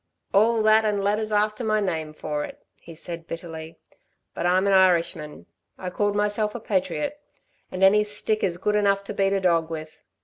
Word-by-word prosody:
"All 220 +2 +4
that, 215 +1 +5
and 205 -2 0
letters 215 +2 0
after 210 +2 +1
my 215 -1 +1
name 160 -6 -2
for 150 -1 -3
it," - - -8 0.2
he 165 - -12
said, 170 0 -7
bitterly. 165 -1 -8 0.6
"But 175 - -1
I'm 185 +2 +3
an 200 - +3
Irishman... 170 -5 +2 0.3
I 180 -1 -5
called 205 +2 0
myself 210 +1 0
a - - -3
patriot 215 - -2 0.5
and 185 +1 -2
any 210 +2 +6
stick 210 +1 -2
is 175 -3 0
good 210 +3 0
enough 200 -1 +2
to 200 - -6
beat 195 -1 +1
a 195 - +1
dog 170 -3 +1
with. 155 -1 -7
195 Hz, 190 wpm, -24 LUFS, 170-210 Hz, 0.6 s, any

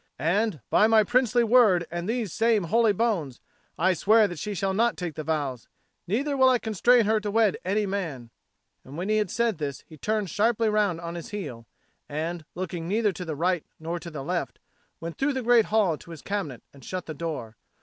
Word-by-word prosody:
And 180 - 0
by 215 - +5
my 220 -1 +5
princely 245 +1 +2
word 220 -7 +5
and 175 +3 -4
these 230 -6 -2
same 225 -3 +2
holy 225 +5 +3
bones, 190 - -1 0.4
I 185 +3 +3
swear 215 +5 +4
that 175 -5 -7
she 210 -1 -4
shall 195 +1 -1
not 230 +3 +1
take 175 -3 -4
the 155 - -5
vows, 145 -6 -2 0.4
neither 275 - 0
will 260 -1 +5
I 255 - +4
constrain 230 +2 +3
her 220 +1 +2
to 210 -1 -4
wed 215 -1 +2
any 205 +3 0
man." 165 -12 -4 0.5
And 135 +4 -10
when 185 +4 -3
he 215 - +3
had 210 -3 0
said 230 -4 0
this, 140 -2 -4
he 155 - -13
turned 210 +1 -1
sharply 225 +1 +2
round 205 -5 +1
on 170 0 -5
his 170 +5 -7
heel, 130 - -6 0.4
and, 160 +2 -4
looking 175 -2 -4
neither 210 +2 +1
to 180 0 -7
the 160 -2 -4
right 175 +2 0 0.2
nor 165 +2 -4
to 170 - -8
the 150 -4 -6
left, 175 +4 -3 0.4
went 165 0 -7
through 275 +1 +1
the 260 -1 -3
great 235 -2 +5
hall 200 -8 +1
to 170 - -15
his 165 -3 -10
cabinet 190 - -4
and 140 -2 -16
shut 185 +6 -5
the 155 - -6
door. 140 -8 -5
190 Hz, 210 wpm, -26 LUFS, 165-220 Hz, 0.5 s, by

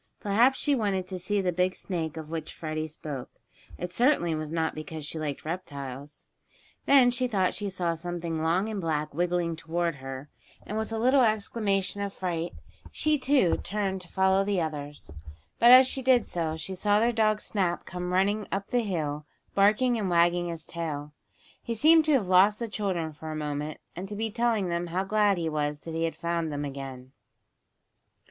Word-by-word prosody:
Perhaps 235 +6 +3
she 290 - +1
wanted 200 -7 0
to 185 -1 -4
see 200 +3 0
the 180 -1 0
big 180 +2 0
snake 165 -4 -4
of 160 0 -7
which 160 -2 -5
Freddie 155 -1 -3
spoke. 150 -4 -7 0.5
It 180 0 -5
certainly 240 - +3
was 155 -1 -4
not 160 -1 0
because 155 0 -7
she 160 - -5
liked 150 -2 -4
reptiles. 145 -4 -6 0.6
Then 260 -3 +6
she 250 +1 0
thought 190 -6 +1
she 205 0 -3
saw 180 -3 -1
something 165 -1 -4
long 175 +6 +1
and 215 -3 -3
black 155 -3 -2
wiggling 175 0 0
toward 165 0 -2
her, 135 +1 -8 0.3
and, 210 - -5
with 220 +1 -2
a 225 - -2
little 255 +4 +4
exclamation 205 -3 0
of 200 -1 -3
fright, 175 -2 -3 0.4
she, 305 -1 +1
too, 260 - +3
turned 195 -2 -2
to 180 - -9
follow 190 +1 +2
the 200 -1 0
others. 150 - -5 0.5
But, 235 - +7
as 255 +1 +10
she 265 +1 -1
did 250 -3 +4
so, 160 -2 -2
she 175 +4 -5
saw 205 +3 +2
their 235 +2 +3
dog 215 -1 +2
Snap 185 -6 -1
come 180 0 -5
running 200 +3 +1
up 195 +1 -3
the 245 -1 +2
hill, 155 -8 -3 0.3
barking 215 +5 +3
and 200 -3 -1
wagging 175 0 +3
his 165 -2 -5
tail. 150 -3 -5 0.5
He 230 - -4
seemed 315 +6 +6
to 310 - +3
have 235 -9 +2
lost 190 +3 +5
the 235 - -3
children 185 -7 -2
for 160 +1 -8
a - - -4
moment 150 0 -4 0.2
and 185 +3 -6
to 210 - -5
be 220 +1 -2
telling 230 -4 +1
them 170 0 -1
how 180 +3 -1
glad 205 -1 +2
he 165 -1 -1
was 150 -1 -2
that 165 - -7
he 165 +1 0
had 165 - -3
found 170 -2 -2
them 145 0 -3
again. 135 -2 -7
180 Hz, 195 wpm, -28 LUFS, 160-210 Hz, 0.6 s, as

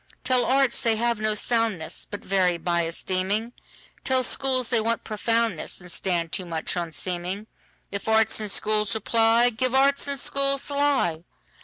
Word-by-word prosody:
Tell 255 -1 +1
arts 265 -2 +2
they 230 -1 +2
have 235 0 0
no 215 0 +1
soundness, 220 -7 -1
But 205 - -7
vary 185 -2 +2
by 170 0 0
esteeming; 190 +7 -2 0.5
Tell 260 -1 +1
schools 255 -2 +2
they 230 -2 +3
want 230 +1 -1
profoundness, 225 -3 -1
And 180 -1 -8
stand 170 -2 -2
too 190 - -1
much 165 0 -2
on 170 -2 -3
seeming:If 185 +5 -6
arts 220 0 +3
and 215 -1 -2
schools 210 +1 +1
reply, 230 +2 +3
Give 255 +3 -1
arts 275 +1 +3
and 280 0 -1
schools 275 +1 +1
the - - -4
lie. 275 - +1
220 Hz, 160 wpm, -24 LUFS, 185-245 Hz, 0.5 s, they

